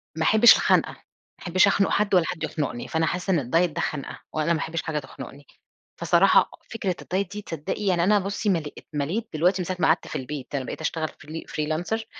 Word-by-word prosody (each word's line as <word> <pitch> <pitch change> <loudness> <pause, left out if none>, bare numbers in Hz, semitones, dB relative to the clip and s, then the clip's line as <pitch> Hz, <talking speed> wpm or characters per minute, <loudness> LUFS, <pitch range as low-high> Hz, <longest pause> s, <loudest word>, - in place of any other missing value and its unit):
ما 160 - -1
أحبش 220 +6 +8
الخنقة، - - +2
ما - - -15 0.4
أحبش 185 +3 +3
أخنق 200 0 +2
حد 205 -1 +1
والّا 175 -2 +4
حد 165 -3 -5
يخنقني، 145 -6 -3
فأنا 160 0 0
حاسّة 180 +4 -2
إن 170 - +3
الدايت 165 +7 +1
ده - - -3
خنقة 150 -3 -4
وأنا 155 +2 +1
ما 160 - -1
أحبش 165 +2 -3
حاجة 155 -2 -2
تخنقني. 140 +1 -11 0.5
فصراحة - - +4 0.2
فكرة 200 -5 -2
الدايت 190 +1 -2
دي 210 0 -6
تصدقي 165 +3 -5
يعني 180 -3 +2
أنا 205 +3 +4
بُصّي 200 +2 -2
مليت 160 -5 -3
مليت 165 +11 -2
دلوقتي 180 +5 +2
من - - -3
ساعة 185 +1 -3
ماقعدت 160 0 +2
في - - -7
البيت 135 +1 -5
أنا 135 -2 -2
بقيت - - -6
أشتغل 160 -1 -1
فري 155 +2 -9
فريلانسر 165 +9 -2
165 Hz, 205 wpm, -25 LUFS, 155-195 Hz, 0.5 s, أحبش